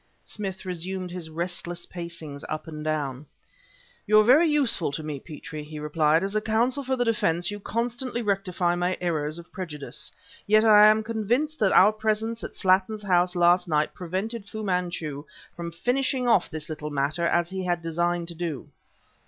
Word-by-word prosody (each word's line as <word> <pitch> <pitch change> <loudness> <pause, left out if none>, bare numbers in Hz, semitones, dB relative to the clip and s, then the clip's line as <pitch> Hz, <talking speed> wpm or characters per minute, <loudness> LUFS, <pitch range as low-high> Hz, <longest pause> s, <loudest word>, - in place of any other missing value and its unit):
Smith 195 -3 -5
resumed 185 +1 -4
his 175 -3 -6
restless 175 +1 -4
pacings 170 -5 -7
up 155 +1 -4
and 155 -1 -7
down. 145 -3 -2 0.8
"You 215 0 +6
are - - +6
very 290 +9 +6
useful 270 - +1
to 155 - -4
me, 150 -2 -4
Petrie," 155 +1 -8
he 150 +1 -9
replied; 150 +2 +2
"as 195 +2 -3
a 215 - +2
counsel 235 +6 +1
for 260 0 0
the 245 -1 0
defense 175 -6 +1
you 205 - -5
constantly 240 +3 -2
rectify 190 -4 0
my 175 +1 0
errors 155 -3 -1
of 170 0 -12
prejudice. 150 -7 -6 0.4
Yet 215 +2 +5
I 210 -1 +8
am 215 +1 +4
convinced 235 +8 -1
that 200 -3 +3
our 205 +3 +7
presence 220 +1 -1
at - - -7
Slattin's 195 +3 +2
house 180 -2 +2
last 175 +1 +4
night 150 -2 +1
prevented 195 +5 -4
Fu 220 0 -5
Manchu 175 -6 -2 0.3
from 170 -1 -5
finishing 250 - 0
off 225 -6 +3
this 155 -1 -5
little 155 -2 -5
matter 145 +4 0
as 175 +1 +1
he 190 -1 -3
had 175 -2 -1
designed 170 +1 -1
to - - -6
do." 165 -5 -5
180 Hz, 175 wpm, -26 LUFS, 160-215 Hz, 0.8 s, I